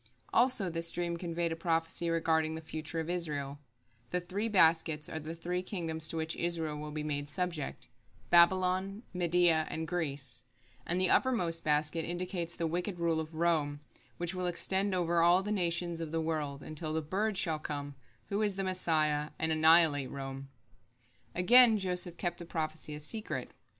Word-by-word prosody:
Also 245 -6 +3
this 165 -1 -1
dream 175 -1 -2
conveyed 170 -1 -2
a - - -1
prophecy 165 0 -1
regarding 160 -1 +1
the - - -5
future 160 0 -5
of 160 - -3
Israel: 145 -5 -2 0.5
The 180 - 0
three 195 +5 -3
baskets 160 -5 +3
are 160 - -5
the 160 +2 -6
three 175 +2 -2
kingdoms 165 -4 0
to 165 - -4
which 160 0 -2
Israel 165 -3 -1
will 150 0 -6
be 150 0 -4
made 145 -1 -3
subject, 155 -6 -3 0.4
Babylon, 185 +4 +4
Media, 175 -2 +3
and 160 0 -4
Greece; 140 -8 -4 0.4
and 175 +2 0
the 185 - +2
uppermost 180 -11 +2
basket 155 +2 +1
indicates 175 0 -3
the 165 - -2
wicked 175 +3 -2
rule 165 -2 +1
of 160 0 -6
Rome, 155 -3 +1 0.4
which 175 +1 -2
will 185 -1 -2
extend 190 +2 0
over 170 -1 +2
all 175 +3 +5
the 210 - -3
nations 175 -3 0
of 165 - -4
the 165 +1 -1
world, 150 -3 -3
until 155 0 -4
the 160 0 -1
bird 200 +6 -1
shall 160 -5 0
come, 145 -1 -5 0.4
who 200 +2 0
is 205 -2 +1
the 195 - -2
Messiah, 155 -5 +1
and 160 0 -1
annihilate 160 -3 +5
Rome. 135 0 -7 0.9
Again 230 +5 +7
Joseph 180 -2 -1
kept 175 0 -2
the 170 - -6
prophecy 155 -2 -4
a - - -7
secret. 215 +9 -3
165 Hz, 170 wpm, -32 LUFS, 155-180 Hz, 0.9 s, Again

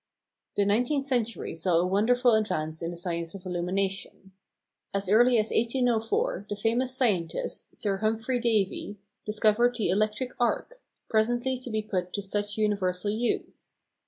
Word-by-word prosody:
The 200 - +2
nineteenth 245 +7 +1
century 240 -4 -1
saw 175 +2 0
a 175 - +3
wonderful 235 +6 +3
advance 160 -8 0
in 165 - -2
the 175 - -6
science 170 0 -3
of 195 -1 -10
illumination. 190 +2 -3 0.6
As 200 -1 0
early 240 +5 +5
as 215 0 +1
1804 230 -4 +1
the 205 - -2
famous 240 +5 0
scientist, 190 -11 0
Sir 200 -2 -1
Humphrey 225 +4 0
Davy, 210 -3 0 0.3
discovered 215 +3 +3
the 220 -7 0
electric 215 +6 0
arc, - - -1 0.3
presently 240 +3 +1
to 255 - -7
be 215 -1 -1
put 180 -4 -3
to 200 - -2
such 205 +1 -3
universal 205 -2 0
use. 230 +3 -3
215 Hz, 145 wpm, -28 LUFS, 195-240 Hz, 0.6 s, early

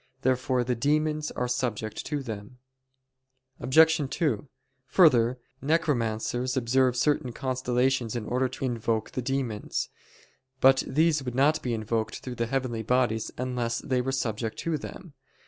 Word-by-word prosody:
Therefore 130 -1 +1
the 125 +1 0
demons 150 +4 0
are 125 - -2
subject 115 -4 -2
to 145 -2 -2
them. 110 0 -7 1.0
Obj. 160 +5 +5
2: 140 -4 -1 0.4
Further, 130 -8 +5 0.2
necromancers 130 -4 0
observe 130 +1 +2
certain 130 -2 +1
constellations 125 -1 0
in 115 -3 -3
order 125 +2 0
to 130 - -5
invoke 115 -3 -1
the 130 - -3
demons. 125 -4 -2 0.7
But 135 0 +6
these 155 +2 +2
would 125 -2 -5
not 145 +4 +3
be 120 -2 -1
invoked 110 0 -2
through 125 - -6
the 115 -1 -2
heavenly 125 -3 -1
bodies 115 -1 +1
unless 125 -2 -1
they 130 -4 0
were 135 +2 -2
subject 115 -4 -2
to 165 -2 -1
them. 170 +2 -9
125 Hz, 140 wpm, -27 LUFS, 115-135 Hz, 1.0 s, But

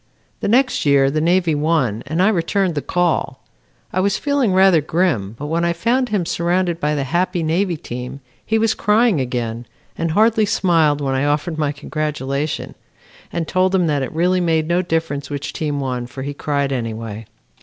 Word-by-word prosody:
The - - -2
next 255 +5 +2
year 140 -2 +4
the 155 +1 0
Navy 175 0 +2
won 145 -8 0
and 160 +5 +1
I 205 - +5
returned 190 -1 0
the 145 - -2
call. 175 -6 -1 0.5
I 185 - 0
was 195 +1 +1
feeling 285 -7 +1
rather 185 -3 +5
grim, 145 - 0
but 145 - -6
when 165 +3 -1
I 170 0 +1
found 240 +9 0
him 200 -5 0
surrounded 175 0 0
by 150 -1 0
the 140 - -1
happy 175 +4 0
Navy 170 +2 0
team, 125 0 -7 0.2
he 220 - 0
was 220 0 +2
crying 210 - +2
again 120 -2 -3 0.3
and 165 - -2
hardly 215 +4 +3
smiled 160 -7 +2
when 135 -1 -1
I 135 +2 0
offered 150 +3 -1
my 150 -2 +1
congratulation, 145 -1 -3 0.6
and 165 -2 -3
told 185 +2 +2
him 180 -2 +3
that 145 -3 0
it 130 - -3
really 180 +3 +1
made 160 -2 +1
no 175 +2 +2
difference 160 -5 -2
which 145 -1 -4
team 150 -2 -2
won 125 -3 -3
for 130 +1 -7
he 145 +1 -4
cried 140 -1 -1
anyway. 115 -3 -4
160 Hz, 185 wpm, -19 LUFS, 140-185 Hz, 0.6 s, I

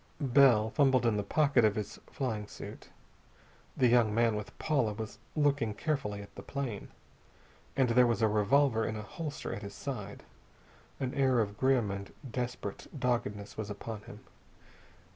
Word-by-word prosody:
Bell 125 -6 +5
fumbled 130 -4 +3
in 115 -2 +3
the 105 - +1
pocket 140 +4 +3
of 105 -1 +4
his 105 -2 -4
flying 110 -6 -3
suit. - - -10 0.9
The 130 - +4
young 115 -3 +4
man 115 -1 +3
with 105 0 -6
Paula 135 -9 +1
was 110 0 -7 0.2
looking 140 -8 +1
carefully 105 -7 -2
at 100 - -15
the - - -9
plane. 135 -7 -4 0.9
And 130 -2 +3
there 125 +1 +5
was 115 -2 +1
a - - +6
revolver 115 +3 +3
in 110 0 -2
a 105 - -5
holster 150 +8 -5
at - - -5
his 100 0 -8
side. 105 -8 -6 0.8
An 130 -2 -2
air 130 -2 +3
of 105 -2 0
grim 125 -3 +2
and 100 0 -6 0.2
desperate 120 -4 -4
doggedness 110 -5 -1
was 110 -2 -4
upon 105 +1 -6
him. - - -12
115 Hz, 160 wpm, -31 LUFS, 105-130 Hz, 0.9 s, a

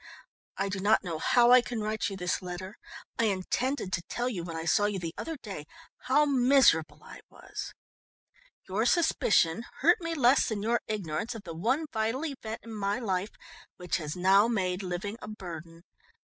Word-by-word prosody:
"_I 200 - 0
do 195 0 -3
not 210 +3 +3
know 165 -4 -4
how 240 +6 +4
I 250 0 +8
can 240 -1 -5
write 215 0 -1
you 195 - -6
this 180 -1 -1
letter. 185 +2 -7 0.4
I 230 - +3
intended 200 +2 -1
to 170 - 0
tell 240 +1 -1
you 195 -9 -3
when 165 -1 -6
I 160 - -4
saw 205 +5 +3
you 205 -1 -1
the 165 -3 -5
other 325 -1 -5
day 195 - -8 0.4
how 295 +4 +4
miserable 245 - +3
I - - -11
was. - - -8 0.9
Your 215 +5 0
suspicion 230 - +3 0.2
hurt 345 +6 +4
me 330 0 -3
less 260 -2 +4
than 210 -2 -3
your 235 +1 +1
ignorance 210 +2 -3
of 220 - -8
the 170 - -7
one 245 - 0
vital 225 +7 -1
event 230 -7 -6
in 230 - -9
my 205 0 -1
life 200 -4 -1 0.5
which 180 -1 -1
has 150 -3 -5
now 190 +4 +5
made 190 -5 -1
living 190 +3 -4
a - - -8
burden. 170 -5 -9
205 Hz, 185 wpm, -29 LUFS, 180-240 Hz, 0.9 s, I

